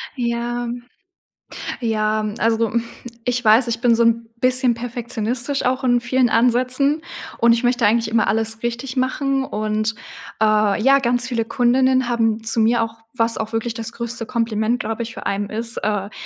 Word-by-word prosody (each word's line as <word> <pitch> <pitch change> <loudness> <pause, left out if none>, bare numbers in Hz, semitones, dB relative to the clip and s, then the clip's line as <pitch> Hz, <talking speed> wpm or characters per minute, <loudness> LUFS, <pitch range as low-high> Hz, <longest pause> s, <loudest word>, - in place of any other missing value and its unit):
Ja. 240 -1 -2 1.1
Ja, 215 -2 0
also 230 0 +2
mhm, 235 0 -1 0.4
ich 250 0 -1
weiß 225 +3 +5
ich 230 -1 -2
bin 240 -1 +4
so 230 - +2
'n 230 0 +2 0.2
bisschen 255 -1 +3
perfektionistisch 240 +2 -3
auch 255 +1 0
in 245 -1 +3
vielen 250 0 +2
Ansätzen 255 +6 +2 0.4
und 235 0 +5
ich 230 - -2
möchte 245 -2 +2
eigentlich 225 +1 +2
immer 225 0 +2
alles 225 +1 -1
richtig 240 +2 -4
machen 270 +1 0
und, 215 -2 -2 0.5
äh, 215 -1 +3
ja, 275 +3 +5
ganz 245 -1 0
viele 235 -3 -2
Kundinnen 255 +1 +2
haben 225 -2 0
zu 225 +1 0
mir 230 +1 +3
auch 225 0 -4 0.2
was 230 -1 +1
auch 220 0 -4
wirklich 225 +1 -1
das 225 0 -6
größte 235 0 -5
Kompliment 230 0 -1
glaube 225 +1 -3
ich 225 0 -7
für - - -8
einen 200 +1 -1
ist, 230 +2 -3
äh 205 -1 -2
235 Hz, 170 wpm, -20 LUFS, 225-245 Hz, 1.1 s, weiß